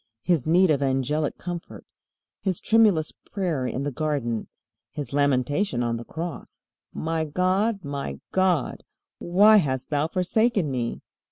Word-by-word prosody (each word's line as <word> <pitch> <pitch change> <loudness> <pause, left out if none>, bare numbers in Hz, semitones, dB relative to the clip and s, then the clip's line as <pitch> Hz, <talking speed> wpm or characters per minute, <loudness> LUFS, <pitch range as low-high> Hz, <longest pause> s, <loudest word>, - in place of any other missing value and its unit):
His 165 -6 +1
need 175 +1 +5
of 145 -2 +1
angelic 140 +3 0
comfort, 175 -1 -7 0.6
His 190 -3 -1
tremulous 210 -9 +3
prayer 170 -10 -3
in 130 +2 -3
the 145 - -2
garden, 135 -6 -2 0.4
His 140 -3 -6
lamentation 140 +1 +1
on 115 -1 -1
the 115 - -7
Cross, 165 +5 -7 0.3
"My 160 0 -2
God, 185 +6 0
my 140 - -4
God, 185 -6 +1 0.4
why 205 +5 +6
hast 130 -7 -1
thou 145 +1 +1
forsaken 185 - +1
me?" 120 -3 -3
155 Hz, 135 wpm, -25 LUFS, 135-185 Hz, 0.6 s, why